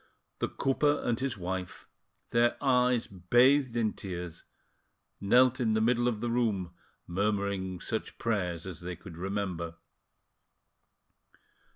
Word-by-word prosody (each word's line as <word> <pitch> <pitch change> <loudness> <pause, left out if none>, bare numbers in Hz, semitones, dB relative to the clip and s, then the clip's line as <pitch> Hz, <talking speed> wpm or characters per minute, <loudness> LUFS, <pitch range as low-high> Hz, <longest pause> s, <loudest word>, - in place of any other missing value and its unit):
The - - 0
cooper 145 +2 +1
and 120 -2 0
his 130 -4 -2
wife, 95 0 -5 0.4
their 120 0 +3
eyes 125 -3 +3
bathed 120 +8 +3
in 110 -2 +1
tears, 90 -3 -6 0.8
knelt 125 +5 +4
in 115 -3 +2
the - - +3
middle 120 +2 +2
of 110 -3 -1
the 120 -1 -1
room, 105 -7 0 0.3
murmuring 100 -1 -1
such 110 +4 -4
prayers 90 -7 -1
as 95 -3 -7
they 90 0 -5
could 85 0 -11
remember. 90 -2 -3
105 Hz, 125 wpm, -30 LUFS, 90-120 Hz, 0.8 s, knelt